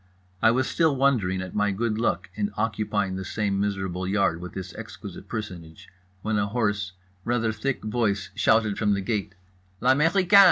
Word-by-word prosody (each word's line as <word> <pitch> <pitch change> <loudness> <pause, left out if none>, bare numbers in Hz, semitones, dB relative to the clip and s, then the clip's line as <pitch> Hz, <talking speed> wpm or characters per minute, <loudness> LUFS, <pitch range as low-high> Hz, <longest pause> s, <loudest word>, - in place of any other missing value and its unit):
I - - +6
was 130 +3 +2
still 160 -4 +2
wondering 110 -9 +2
at 90 - -8
my 105 0 +2
good 110 +2 -1
luck 115 - 0
in 205 -1 -1
occupying 105 -3 0
the 95 - -4
same 100 0 -1
miserable 95 -2 -2
yard 95 -4 +1
with 90 - -7
this 95 -2 -6
exquisite - - -9
personage 90 -7 -7 0.3
when 110 -1 +1
a 100 - +1
hoarse, 105 -3 -1 0.3
rather 115 -2 +1
thick 135 +4 -2
voice 105 -3 0
shouted 110 -2 +2
from 105 -2 +3
the 100 - -2
gate: 100 -1 -2 0.4
"_L'américain! 165 +10 +5
105 Hz, 165 wpm, -26 LUFS, 95-120 Hz, 0.4 s, I